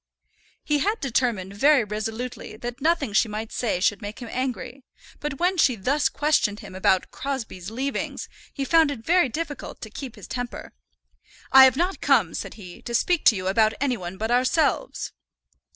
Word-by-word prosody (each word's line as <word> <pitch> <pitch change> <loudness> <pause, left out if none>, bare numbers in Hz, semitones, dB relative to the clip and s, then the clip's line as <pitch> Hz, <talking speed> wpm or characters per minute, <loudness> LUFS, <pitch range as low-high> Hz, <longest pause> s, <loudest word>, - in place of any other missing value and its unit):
He 295 -1 +1
had 420 +9 0
determined 235 -7 -1
very 280 +3 +5
resolutely 220 +2 -5
that 240 +3 -6
nothing 310 -7 +1
she 225 - +4
might 215 +1 -5
say 225 -7 -1
should 195 +2 +1
make 205 +1 -6
him 240 -3 -8
angry, 255 +1 -4 0.4
but 290 -2 -4
when 365 +2 +2
she 260 -5 +4
thus 270 +9 +1
questioned 285 -9 +1
him - - -10
about 185 0 +1
"Crosbie's 230 -9 -5
leavings" 265 +5 -3 0.2
he 275 - -3
found 325 0 +4
it 245 -6 -6
very 345 -4 +4
difficult 300 +1 -5
to 220 - -8
keep 260 0 -7
his - - -11
temper. 245 -1 -6 0.8
"I 265 0 +10
have 265 0 +3
not 355 +3 -1
come," 225 - +3
said - - -5
he, 180 -5 -11
"to 235 - -4
speak 350 +7 +1
to 225 - +7
you 185 -1 -4
about 215 +3 +3
any 265 -2 +1
one 180 -3 -7
but 220 +3 -2
ourselves." 255 +6 +1
245 Hz, 180 wpm, -24 LUFS, 215-285 Hz, 0.8 s, I